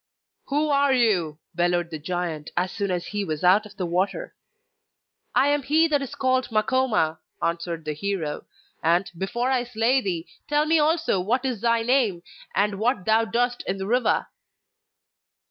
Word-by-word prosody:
'Who 300 +2 0
are 280 -1 +3
you?' 200 - +2 0.2
bellowed 175 0 0
the 160 - -5
giant, 165 -2 -3
as 180 +1 +1
soon 200 -1 -2
as 180 -1 -2
he 205 -1 -3
was 155 -4 -4
out 195 +4 +5
of 210 -1 -18
the 185 - -2
water. 185 - -1 1.0
'I 275 - +4
am 290 0 +2
he 310 +5 +3
that 290 -2 +2
is 275 - -6
called 260 -1 +1
Makoma,' 215 -7 +1 0.2
answered 170 -1 -2
the 155 - -2
hero; 160 -2 -3 0.3
'and, 175 +4 +2
before 235 +8 -1
I 255 -2 +2
slay 245 +2 +1
thee, 175 -6 -3 0.2
tell 295 +1 +2
me 320 +1 +3
also 315 - +2
what 240 +8 0
is 245 -6 -2
thy 230 -1 +2
name 230 -8 +1 0.3
and 200 0 +1
what 220 -4 0
thou 220 +1 +3
doest 245 +2 0
in 190 - -1
the 190 - -4
river? 245 +4 +1
210 Hz, 170 wpm, -24 LUFS, 175-255 Hz, 1.0 s, out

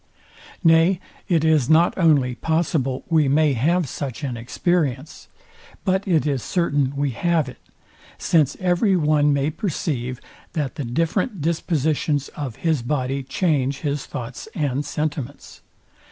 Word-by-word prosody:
Nay 165 +2 +5 0.3
it 165 -4 +3
is 155 -6 +3
not 165 +2 +4
only 145 -8 +3
possible 150 -3 -1
we 160 -4 +3
may 150 +1 +3
have 160 +7 +1
such 135 +1 -5
an 130 -4 -2
experience, 140 +3 -2 0.6
but 190 +1 +1
it 165 -5 +2
is 140 -4 0
certain 145 -5 0
we 140 -1 0
have 165 +3 +1
it; 130 - -10 0.6
since 150 -5 +2
every 185 +2 +2
one 150 -3 +3
may 140 +1 +1
perceive, 140 - -3 0.3
that 150 -6 -2
the 145 - -5
different 165 - -1
dispositions 155 -2 0
of 135 -7 -6
his 160 -5 +2
body 135 +1 -1
change 135 -1 0
his 145 -2 -2
thoughts 120 - -7
and 145 -4 -1
sentiments. 145 -3 -4
150 Hz, 135 wpm, -22 LUFS, 135-165 Hz, 0.6 s, Nay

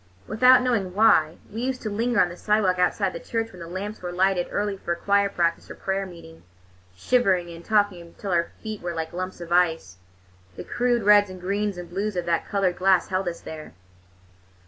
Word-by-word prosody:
Without 250 +3 +5
knowing 205 -8 -1
why, 165 -7 +4 0.2
we 225 - -4
used 255 0 -3
to 215 - -2
linger 235 +3 0
on 175 - +4
the 175 - -8
sidewalk 195 -2 +1
outside 185 +2 +1
the - - -6
church 225 +3 -3
when 185 - -13
the 165 - -7
lamps 200 +5 -6
were 180 -1 -5
lighted 185 0 +1
early 205 -1 -1
for 175 -3 -3
choir 200 +3 +2
practice 170 -3 -1
or - - -8
prayer 195 0 -2
meeting, 165 -2 -13 0.5
shivering 185 - +1
and 165 0 -10
talking 205 -4 +1
until 170 +4 -8
our 170 -1 +1
feet 215 -2 -5
were 175 -1 -4
like 160 0 -4
lumps 185 +1 -5
of 170 0 -8
ice. 165 - +1 0.6
The - - -7
crude 240 -2 0
reds 205 -1 +6
and 185 0 -9
greens 200 +1 -2
and 175 -1 -7
blues 195 +4 -3
of 175 -1 -2
that 170 -1 0
colored 190 -3 0
glass 190 0 +3
held 190 0 -1
us 170 -1 -4
there. 155 -1 -9
185 Hz, 205 wpm, -24 LUFS, 175-210 Hz, 0.6 s, reds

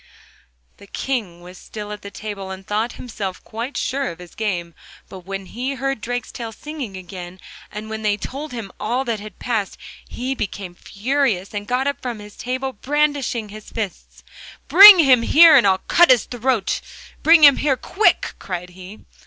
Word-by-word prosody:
The 200 - -16
King 205 -9 -4
was 180 +1 -13
still 210 -1 -8
at 210 0 -7
table, 205 -3 -6
and 190 0 -8
thought 215 +4 -2
himself 200 -6 -6
quite 235 +5 -6
sure 275 +1 -2
of 165 - -9
his 180 -1 -13
game; 175 -6 -3 0.4
but 185 -1 -12
when 195 0 -5
he 255 +7 -4
heard 270 -2 -3
Drakestail 235 -1 -5
singing 285 -10 -7
again, 180 0 -9 0.3
and 210 +1 -7
when 220 0 -6
they 210 -1 0
told 280 +8 -7
him 225 -6 -7
all 245 +5 -1
that 230 -3 -2
had 215 +1 -11
passed, 220 -5 -3 0.3
he 255 +2 -3
became 200 -6 -5
furious 215 0 -2
and 205 0 -5
got 250 +2 0
up 280 0 -2
from 225 -5 -6
table 260 +4 -4
brandishing 280 -3 -1
his 215 +1 -11
fists. 210 -5 -7 0.4
'Bring 400 +1 +11
him 265 -7 +5
here, 320 +6 +7
and 245 -7 +5
I'll 190 -1 +3
cut 345 0 +5
his 250 -4 +5
throat! 245 -4 -1 0.4
bring 325 0 +6
him 285 -2 +8
here 275 -3 +1
quick!' 425 +10 +1
cried 180 -1 -6
he. 185 +3 -12
225 Hz, 170 wpm, -20 LUFS, 195-265 Hz, 0.4 s, Bring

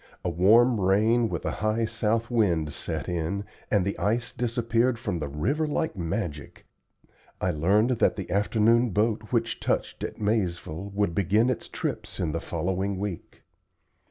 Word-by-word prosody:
A 90 - +1
warm 110 +7 +5
rain 110 +5 +3
with - - -4
a - - 0
high 110 +2 +1
south 115 +2 -1
wind 85 -10 +1
set - - -4
in, 90 +4 -2 0.2
and 100 -4 +2
the 100 - -1
ice 115 +4 0
disappeared 120 0 +1
from 90 -7 -3
the 75 - -3
river 135 - -1
like 160 +2 -1
magic. 85 -4 -4 0.7
I 95 - +1
learned 100 +10 +2
that 120 - +2
the 95 -4 -6
afternoon 115 +4 +3
boat 110 +2 0
which 115 -2 0
touched - - -2
at - - -4
Maizeville 100 -4 -1
would 100 -4 +1
begin 105 +7 +2
its 125 - -4
trips - - -4
in 80 - 0
the 85 +2 -3
following 95 +4 -2
week. 100 -3 -6
105 Hz, 155 wpm, -26 LUFS, 90-115 Hz, 0.7 s, warm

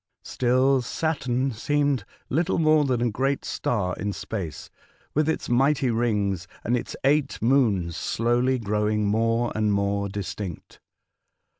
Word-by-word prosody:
Still 130 +2 +2
Saturn 130 -1 -1
seemed 140 0 0 0.2
little 170 +7 0
more 155 -2 +4
than 125 -3 0
a 120 - +1
great 135 +6 -1
star 90 -6 -1
in 105 0 -2
space, 95 -8 -6 0.4
with 155 +1 +2
its 160 - -1
mighty 130 +1 +2
rings 105 -6 0 0.2
and 120 - +1
its 120 - -4
eight 145 +1 +2
moons 110 - +2
slowly 120 +3 +1
growing 105 -1 0
more 115 +3 +1
and 110 -1 +1
more 100 0 0
distinct. 95 -2 -6
120 Hz, 130 wpm, -25 LUFS, 105-135 Hz, 0.4 s, more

